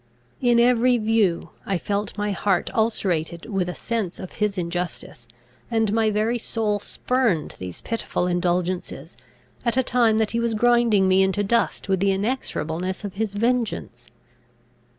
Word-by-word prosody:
In 240 Hz, -2 st, +4 dB
every 245 Hz, +1 st, +4 dB
view 215 Hz, -6 st, +1 dB
I 195 Hz, -, -1 dB
felt 205 Hz, +3 st, -3 dB
my 205 Hz, 0 st, -1 dB
heart 190 Hz, -1 st, 0 dB
ulcerated 180 Hz, -7 st, 0 dB
with 195 Hz, -5 st, -1 dB
a 180 Hz, -, -5 dB
sense 225 Hz, -6 st, -3 dB
of 185 Hz, -, -7 dB
his 210 Hz, -2 st, -1 dB
injustice; 170 Hz, -8 st, -4 dB, 0.4 s
and 225 Hz, -3 st, +1 dB
my 220 Hz, -1 st, +3 dB
very 215 Hz, +3 st, 0 dB
soul 215 Hz, -2 st, -1 dB
spurned 230 Hz, -, 0 dB
these 90 Hz, -2 st, -7 dB
pitiful 230 Hz, -5 st, -2 dB
indulgences, 180 Hz, 0 st, -1 dB, 0.5 s
at 235 Hz, 0 st, 0 dB
a 260 Hz, -, +4 dB
time 235 Hz, -3 st, +3 dB
that 220 Hz, -1 st, +1 dB
he 235 Hz, -, 0 dB
was 235 Hz, -1 st, 0 dB
grinding 235 Hz, -4 st, +4 dB
me 190 Hz, 0 st, +4 dB
into 190 Hz, +2 st, +1 dB
dust 230 Hz, +1 st, 0 dB
with 190 Hz, -1 st, +1 dB
the 200 Hz, +1 st, +2 dB
inexorableness 190 Hz, -, -2 dB
of 200 Hz, -2 st, -5 dB
his 205 Hz, 0 st, -3 dB
vengeance. 225 Hz, -, -1 dB
205 Hz, 150 wpm, -23 LUFS, 185-230 Hz, 0.5 s, In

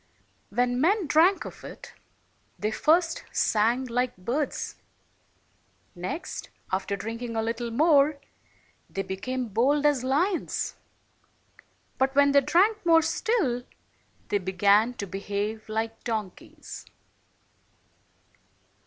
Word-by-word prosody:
When 245 Hz, +3 st, +1 dB
men 385 Hz, +4 st, +3 dB
drank 335 Hz, +6 st, +4 dB
of -, -, -10 dB
it, -, -, -10 dB, 0.6 s
they 210 Hz, +1 st, -1 dB
first 330 Hz, +7 st, +2 dB
sang 230 Hz, +4 st, +2 dB
like 250 Hz, -1 st, -1 dB
birds; 250 Hz, +11 st, -3 dB, 1.2 s
next, 185 Hz, -, -5 dB, 0.2 s
after 195 Hz, +1 st, -1 dB
drinking 230 Hz, +3 st, -5 dB
a 225 Hz, -, +1 dB
little 230 Hz, +1 st, -2 dB
more, 290 Hz, +3 st, +4 dB, 0.7 s
they 195 Hz, -, -3 dB
became 250 Hz, +7 st, -3 dB
bold 275 Hz, +8 st, +2 dB
as 290 Hz, -4 st, +3 dB
lions; 330 Hz, +8 st, 0 dB, 1.2 s
but 265 Hz, +1 st, +1 dB
when 280 Hz, 0 st, +5 dB
they 280 Hz, 0 st, +6 dB
drank 410 Hz, +9 st, +2 dB
more 330 Hz, -1 st, +5 dB
still, 315 Hz, -, 0 dB, 0.7 s
they 205 Hz, -, +1 dB
began 200 Hz, +5 st, +3 dB
to 205 Hz, -, -4 dB
behave 205 Hz, +3 st, -4 dB
like 225 Hz, +1 st, -3 dB
donkeys. 215 Hz, -5 st, -6 dB
245 Hz, 105 wpm, -27 LUFS, 215-295 Hz, 1.2 s, they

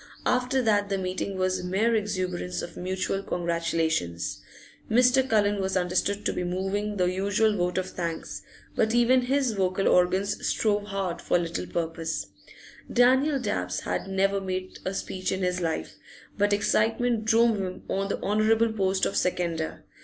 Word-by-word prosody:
After 255 Hz, +1 st, +1 dB
that 205 Hz, -3 st, +2 dB
the 195 Hz, -, 0 dB
meeting 190 Hz, +1 st, -3 dB
was 185 Hz, -1 st, 0 dB
mere 200 Hz, +6 st, +1 dB
exuberance 185 Hz, -, -2 dB
of -, -, -8 dB
mutual 185 Hz, +1 st, -2 dB
congratulations. 165 Hz, -, -1 dB, 0.5 s
Mr. 250 Hz, +3 st, +4 dB
Cullen 205 Hz, -2 st, +2 dB
was 190 Hz, 0 st, 0 dB
understood 185 Hz, +3 st, 0 dB
to -, -, +1 dB
be -, -, -2 dB
moving 195 Hz, +4 st, -2 dB
the 180 Hz, -, +2 dB
usual 200 Hz, +4 st, +1 dB
vote 180 Hz, -1 st, -1 dB
of 185 Hz, 0 st, -2 dB
thanks, 170 Hz, -2 st, -4 dB, 0.3 s
but 220 Hz, +1 st, +2 dB
even 245 Hz, +2 st, +5 dB
his 265 Hz, 0 st, +1 dB
vocal 190 Hz, -1 st, 0 dB
organs 185 Hz, +3 st, +2 dB
strove 205 Hz, -2 st, +1 dB
hard 195 Hz, -4 st, -3 dB
for -, -, +2 dB
little 170 Hz, +1 st, -3 dB
purpose. 165 Hz, -1 st, -3 dB, 0.7 s
Daniel 265 Hz, +4 st, +4 dB
Dabbs 90 Hz, -, -2 dB
had -, -, -3 dB
never 195 Hz, +1 st, +1 dB
made 185 Hz, -1 st, -4 dB
a 190 Hz, +1 st, -2 dB
speech 185 Hz, -1 st, -3 dB
in 190 Hz, 0 st, -2 dB
his 180 Hz, 0 st, 0 dB
life, 165 Hz, -2 st, -3 dB, 0.4 s
but 205 Hz, 0 st, +2 dB
excitement 220 Hz, +2 st, +1 dB
drove 225 Hz, -1 st, +4 dB
him 185 Hz, -1 st, -5 dB
on 195 Hz, +1 st, -1 dB
the 200 Hz, -, -2 dB
honourable 220 Hz, +2 st, +2 dB
post 190 Hz, -2 st, +1 dB
of -, -, -2 dB
seconder. 170 Hz, -3 st, -1 dB
195 Hz, 155 wpm, -27 LUFS, 180-215 Hz, 0.7 s, even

